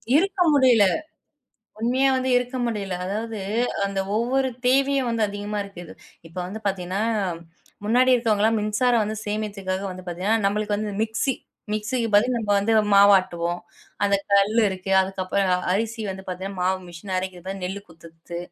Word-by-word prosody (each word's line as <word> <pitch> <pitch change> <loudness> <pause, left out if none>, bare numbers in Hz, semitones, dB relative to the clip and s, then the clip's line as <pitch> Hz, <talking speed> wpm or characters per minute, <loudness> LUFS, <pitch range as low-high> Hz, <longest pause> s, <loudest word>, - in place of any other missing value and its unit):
இருக்க 380 +4 +2
முடியல. 255 -6 +5 1.0
உண்மையா 255 +4 +2
வந்து 260 0 -1
இருக்க 250 +1 -1
முடியல. 205 -5 -3
அதாவது 215 +3 -4 0.5
அந்த 195 -1 -2 0.2
ஒவ்வொரு 260 +4 +1 0.2
தேவையும் 270 0 +3
வந்து 230 -1 0
அதிகமா 205 +1 -4
இருக்குது. 175 -3 -10 0.3
இப்போ 165 +2 -10
வந்து 215 +4 -7
பார்த்தீங்கன்னா, 190 0 -1 0.8
முன்னாடி 250 +4 +4
இருக்கவங்கலாம் 225 -2 +2
மின்சாரம் 225 +3 +2
வந்து 215 +1 -4
சேமிக்றதுக்காக 200 -3 -3
வந்து 185 0 -9
பார்த்தீங்கன்னா, 190 +6 0
நம்பளுக்கு 210 +1 0
வந்து 210 0 -3
மிக்ஸி 225 +4 0 0.4
மிக்ஸிக்கு 225 +3 -1
பதில் 240 +5 +4
நம்ப 210 -2 -3
வந்து 200 +3 +1 0.2
மாவு 200 0 +8
ஆட்டுவோம். 175 -1 -3 0.4
அந்த 200 0 +3 0.2
கல் 200 +3 +3
இருக்கு. 190 0 -5
அதுக்கப்பறம் 190 0 -1
அ - - +5 0.2
அரிசி 225 +3 -1
வந்து 190 0 -5
பார்த்தீங்கன்னா, 190 +1 -5
மாவு 185 +1 +1
மிஷின் 175 +3 -8
அரைக்கிது 185 -1 -5
பாரு, 195 +1 -4
நெல்லு 190 +2 -4
குத்துறத்து, 165 +1 -11
205 Hz, 150 wpm, -24 LUFS, 190-230 Hz, 1.0 s, மாவு